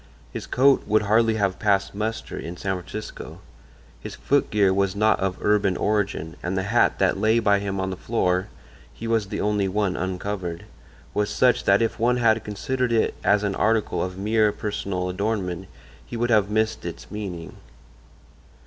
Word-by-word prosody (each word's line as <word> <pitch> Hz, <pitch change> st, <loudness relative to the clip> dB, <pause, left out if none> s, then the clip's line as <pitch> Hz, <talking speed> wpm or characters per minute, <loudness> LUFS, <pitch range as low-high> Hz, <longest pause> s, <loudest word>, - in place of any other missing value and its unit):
His -, -, -6 dB
coat 135 Hz, +1 st, +4 dB
would 110 Hz, +1 st, +3 dB
hardly 110 Hz, +2 st, +3 dB
have 100 Hz, -3 st, 0 dB
passed 100 Hz, -1 st, +1 dB
muster 110 Hz, +2 st, -4 dB
in 85 Hz, +2 st, -6 dB
San 95 Hz, 0 st, -2 dB
Francisco; 100 Hz, +4 st, -8 dB, 0.6 s
his -, -, -8 dB
foot 145 Hz, 0 st, +1 dB
gear 100 Hz, -3 st, +3 dB
was 100 Hz, 0 st, +1 dB
not 110 Hz, +1 st, +3 dB
of 95 Hz, -1 st, -1 dB
urban 105 Hz, -3 st, +2 dB
origin, 100 Hz, -6 st, -1 dB
and 95 Hz, +2 st, -2 dB
the 95 Hz, -, 0 dB
hat 115 Hz, +5 st, +2 dB
that -, -, +1 dB
lay 110 Hz, +1 st, +3 dB
by 100 Hz, -3 st, +3 dB
him 100 Hz, -1 st, -3 dB
on 95 Hz, 0 st, -2 dB
the -, -, -3 dB
floor 95 Hz, -2 st, 0 dB, 0.4 s
(he 115 Hz, -, -7 dB
was 115 Hz, -3 st, +1 dB
the -, -, -4 dB
only 105 Hz, -1 st, +1 dB
one 95 Hz, -1 st, 0 dB
uncovered) 95 Hz, -1 st, -4 dB, 0.5 s
was 105 Hz, 0 st, 0 dB
such 125 Hz, -1 st, +2 dB
that 100 Hz, +3 st, +4 dB
if 115 Hz, -, -2 dB
one 120 Hz, +2 st, +2 dB
had 110 Hz, -2 st, +3 dB
considered 125 Hz, +4 st, -2 dB
it 115 Hz, -1 st, +2 dB
as 105 Hz, 0 st, +3 dB
an 100 Hz, -1 st, 0 dB
article 110 Hz, +2 st, +1 dB
of 90 Hz, 0 st, -5 dB
mere 105 Hz, +1 st, +2 dB
personal 100 Hz, -3 st, -3 dB
adornment 95 Hz, -2 st, -2 dB, 0.4 s
he 120 Hz, -, -7 dB
would 120 Hz, +1 st, 0 dB
have 105 Hz, -3 st, +3 dB
missed 110 Hz, +1 st, 0 dB
its 85 Hz, -1 st, -8 dB
meaning. 95 Hz, -6 st, -6 dB
105 Hz, 175 wpm, -24 LUFS, 95-110 Hz, 0.6 s, coat